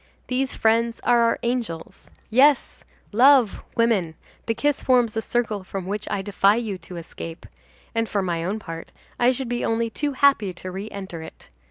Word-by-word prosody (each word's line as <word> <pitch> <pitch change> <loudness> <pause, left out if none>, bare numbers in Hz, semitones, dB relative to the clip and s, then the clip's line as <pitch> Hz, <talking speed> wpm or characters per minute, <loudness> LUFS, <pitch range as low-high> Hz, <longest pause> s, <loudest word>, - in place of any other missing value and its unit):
These 260 +1 -1
friends 230 +1 +2
are 240 -1 +4
our 230 0 +3
angels. 235 -9 -4 0.2
Yes, 275 +4 +3 0.3
love, 250 0 +5 0.2
woman, 205 -9 +2 0.3
the 225 - 0
kiss 290 +5 0
forms 245 -4 +3
a 225 - 0
circle 220 -4 -1
from 190 0 -6
which 205 +2 -4
I 195 -1 -2
defy 200 +1 +3
you 220 -5 -3
to 175 +1 -10
escape; 165 0 -8 0.5
and, 225 -1 0
for 200 -2 0
my 170 -2 -1
own 195 +5 -2
part, 165 -5 -8 0.3
I 245 +1 +5
should 260 0 -3
be 240 0 -2
only 225 0 0
too 290 +2 -2
happy 260 -9 +3
to 185 +1 -7
re 195 +4 -6
enter 190 -5 -7
it. 160 - -12
225 Hz, 180 wpm, -23 LUFS, 190-240 Hz, 0.5 s, love